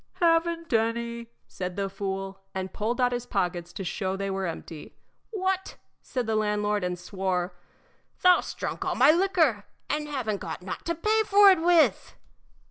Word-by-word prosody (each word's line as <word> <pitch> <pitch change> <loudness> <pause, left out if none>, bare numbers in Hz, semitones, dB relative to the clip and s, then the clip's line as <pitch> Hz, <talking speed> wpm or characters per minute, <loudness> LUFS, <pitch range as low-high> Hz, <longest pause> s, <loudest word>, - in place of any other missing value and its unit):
"Haven't 335 -2 +1
any!" 235 +1 0 0.2
said 180 -1 -5
the 200 -1 -1
fool, 195 0 -5
and 190 0 -4
pulled 230 +4 -2
out 250 -1 +3
his 245 0 -3
pockets 175 -4 -2
to 195 - -5
show 190 +1 -2
they 195 0 -3
were 190 -1 -2
empty. 160 -2 -8 0.3
"What!" 380 -3 -2 0.3
said 250 -2 -3
the 220 0 0
landlord, 210 -1 0
and 180 0 -2
swore; 180 -1 -2 0.7
"thou 360 -1 +7
'st - - -7
drunk - - -3
all 370 -2 -1
my 265 +4 +7
liquor 325 - +2 0.3
and 300 0 -1
haven't 240 -8 -3
got - - -6
nought 185 - -6
to 335 - 0
pay 430 +6 +2
for 405 0 +8
it 365 -4 +2
with!" 340 -1 +3
225 Hz, 170 wpm, -27 LUFS, -, 0.7 s, for